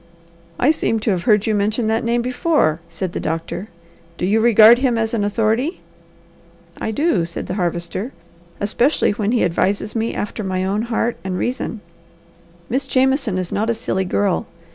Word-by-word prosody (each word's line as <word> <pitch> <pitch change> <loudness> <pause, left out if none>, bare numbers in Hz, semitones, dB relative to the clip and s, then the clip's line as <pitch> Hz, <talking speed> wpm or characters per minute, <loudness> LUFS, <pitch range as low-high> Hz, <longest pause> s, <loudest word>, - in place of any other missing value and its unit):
"I 275 - +4
seem 225 -7 0
to 220 - +1
have 180 -2 -2
heard 210 -3 +4
you 220 - +1
mention 215 +3 0
that 220 +1 0
name 235 +1 +1
be 250 - -2
fore," 250 - +1
said 170 +2 -4
the - - -3
doctor. 165 +4 -4 0.5
"Do - - -1
you 210 +4 +2
regard 225 +1 +7
him 255 -3 +1
as 225 0 -1
an 220 -3 0
authority?" 225 - 0 1.0
"I - - -2
do!" 220 - +1
said 170 0 -5
the - - -4
Harvester. 175 +4 -3 0.5
"Especially 235 +8 +2
when 205 +1 -1
he 240 - +2
advises 200 +5 0
me 225 0 -1
after 210 +1 -4
my 185 -1 -1
own 200 +3 0
heart 235 0 -1
and 185 -1 -3
reason. 240 -2 -3 0.9
Miss 265 +3 -1
Jameson 265 -6 +2
is 185 -2 -3
not 220 +3 0
a 235 - +1
silly 200 -5 -2
girl. 195 0 0
220 Hz, 180 wpm, -20 LUFS, 190-240 Hz, 1.0 s, regard